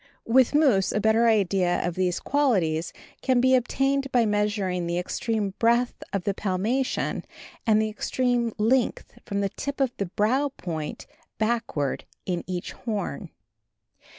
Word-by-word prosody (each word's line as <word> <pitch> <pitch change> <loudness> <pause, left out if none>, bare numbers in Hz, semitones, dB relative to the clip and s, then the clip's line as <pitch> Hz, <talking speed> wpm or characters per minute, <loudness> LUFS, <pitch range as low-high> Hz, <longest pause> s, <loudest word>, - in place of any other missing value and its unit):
With 255 +4 +4
moose 255 -11 +4
a - - 0
better 220 +2 +3
idea 195 -5 +2
of 175 - -2
these 180 0 0
qualities 185 - +1 0.3
can 260 -2 +2
be 260 +1 +4
obtained 270 +2 +1
by 240 -2 +3
measuring 205 -4 0
the 170 0 -1
extreme 205 +3 -1
breadth 235 +2 +2
of 195 -2 -2
the 200 - 0
palmation, 210 +8 -1 0.4
and 215 -1 +5
the 220 0 +1
extreme 240 +1 0
length 235 +3 0
from 200 0 -1
the 200 - 0
tip 280 +8 -5
of 265 -3 +1
the 200 - -2
brow 245 +10 +1
point 160 -4 -5 0.3
backward 220 - -1 0.2
in 180 -2 -2
each 180 -1 -4
horn. 210 - -4
215 Hz, 145 wpm, -26 LUFS, 185-245 Hz, 0.4 s, and